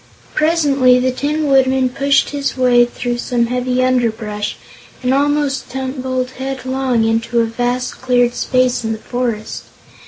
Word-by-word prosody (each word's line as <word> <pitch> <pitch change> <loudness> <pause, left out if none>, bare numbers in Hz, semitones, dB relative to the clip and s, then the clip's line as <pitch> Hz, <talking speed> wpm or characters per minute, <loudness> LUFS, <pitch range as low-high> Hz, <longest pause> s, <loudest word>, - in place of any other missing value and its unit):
Presently 290 -5 +3
the 255 +1 +1
Tin 300 +4 -2
Woodman 265 -2 +3
pushed 275 +2 +1
his 280 -2 -3
way 245 -1 +4
through 240 0 -4
some 240 -1 0
heavy 250 +1 0
underbrush, 220 -5 -1 0.5
and 255 +1 +2
almost 285 -1 0
tumbled 260 0 -3
headlong 260 -2 -1
into 225 +1 0
a 230 - +3
vast 245 +2 -3
cleared 245 -1 +2
space 255 -1 +1
in 225 0 -1
the - - -5
forest. 235 -2 -4
255 Hz, 135 wpm, -17 LUFS, 240-265 Hz, 0.5 s, way